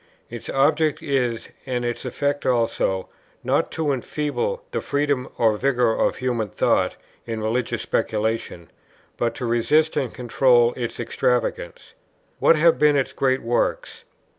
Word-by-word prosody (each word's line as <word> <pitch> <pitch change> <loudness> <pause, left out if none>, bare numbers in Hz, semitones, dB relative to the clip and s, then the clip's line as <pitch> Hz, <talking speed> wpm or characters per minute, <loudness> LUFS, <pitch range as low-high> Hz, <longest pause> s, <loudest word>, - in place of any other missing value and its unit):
Its 120 -2 -7
object 150 +3 +2
is, 125 -5 -1 0.2
and 125 -2 -2
its 120 +2 -3
effect 145 +3 -1
also, 115 -6 0 0.4
not - - +1
to 160 -3 -1
enfeeble 150 - -2
the - - -2
freedom 140 -3 -1
or 110 -2 +3
vigour 125 -2 +2
of - - +1
human 120 -4 -2
thought - - +1 0.3
in 115 -1 -3
religious 110 +3 -1
speculation, 110 -7 -2 0.4
but 120 -1 -1
to 125 - -4
resist 150 +7 +2
and 135 -5 -1
control 120 -1 +3
its 120 -2 -5
extravagance. 120 0 -2 0.5
What - - +5
have 165 +2 +4
been 150 -1 +5
its 135 -2 0
great 130 -1 +1
works? 120 +1 -1
125 Hz, 140 wpm, -23 LUFS, 115-145 Hz, 0.5 s, What